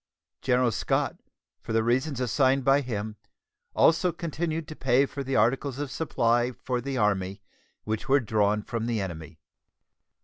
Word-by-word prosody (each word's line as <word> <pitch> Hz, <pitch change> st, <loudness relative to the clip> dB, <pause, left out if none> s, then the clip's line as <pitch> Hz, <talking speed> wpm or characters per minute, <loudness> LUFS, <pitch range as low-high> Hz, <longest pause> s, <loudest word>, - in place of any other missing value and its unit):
General 125 Hz, -2 st, +2 dB
Scott, -, -, -1 dB, 0.4 s
for 115 Hz, -, -6 dB
the 110 Hz, 0 st, +3 dB
reasons 130 Hz, +4 st, 0 dB
assigned 130 Hz, +1 st, +2 dB
by 135 Hz, +1 st, +5 dB
him, 110 Hz, -4 st, -4 dB, 0.6 s
also 170 Hz, +2 st, +4 dB
continued 165 Hz, -1 st, -3 dB
to 155 Hz, -, -8 dB
pay 130 Hz, 0 st, +3 dB
for 140 Hz, 0 st, -6 dB
the 135 Hz, 0 st, -2 dB
articles 130 Hz, +4 st, +1 dB
of 145 Hz, -1 st, -4 dB
supply 120 Hz, -6 st, +1 dB
for 125 Hz, 0 st, -3 dB
the 135 Hz, +1 st, -3 dB
Army 100 Hz, -3 st, 0 dB, 0.4 s
which 110 Hz, +6 st, -3 dB
were 140 Hz, +1 st, +5 dB
drawn 105 Hz, -3 st, +1 dB
from 115 Hz, 0 st, -3 dB
the 115 Hz, -2 st, 0 dB
enemy. 80 Hz, -4 st, -6 dB
125 Hz, 150 wpm, -27 LUFS, 110-140 Hz, 0.6 s, by